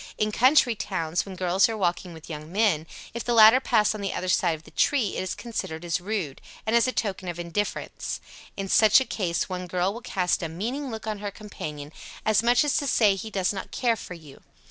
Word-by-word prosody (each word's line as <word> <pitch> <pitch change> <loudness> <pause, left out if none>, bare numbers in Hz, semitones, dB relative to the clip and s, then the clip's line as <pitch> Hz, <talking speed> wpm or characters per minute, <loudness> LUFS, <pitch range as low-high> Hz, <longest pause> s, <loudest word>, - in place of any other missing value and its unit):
In 215 0 0
country 255 +2 +4
towns, 180 -5 -2
when 190 - -7
girls 185 +3 +2
are 225 - -3
walking 180 -1 -1
with 160 -1 -12
young 155 0 -7
men, 190 -6 +1 0.3
if 235 - -4
the 240 - 0
latter 220 +3 +8
pass 215 -5 +2
on 215 - -6
the 195 - -2
other 185 - -3
side 180 -3 +2
of 155 - -14
the - - -16
tree 255 -9 +1
it - - -2
is 185 - -3
considered 190 -8 -5
as 170 +1 -1
rude, 185 -8 -3 0.2
and 220 +2 +1
as 235 +1 +4
a - - +1
token 195 -6 -3
of 175 -1 -4
indifference; 175 +4 -3 0.4
in 195 -1 -3
such 215 +3 +6
a 265 - -1
case 175 -8 -1
one 180 -1 -5
girl 180 +2 0
will 235 - -8
cast 185 -7 0
a 165 - -3
meaning 240 - -4
look 220 -2 -6
on 215 -2 -3
her 205 0 -4
companion 155 -8 -8 0.3
as 215 -1 +4
much 240 +3 +4
as 295 - +1
to 285 - -1
say, 215 -5 +4
"he 195 +3 -6
does 195 -2 0
not 195 - -6
care 240 -3 +1
for 180 - -8
you." 150 -5 -14
195 Hz, 235 wpm, -26 LUFS, 175-220 Hz, 0.4 s, latter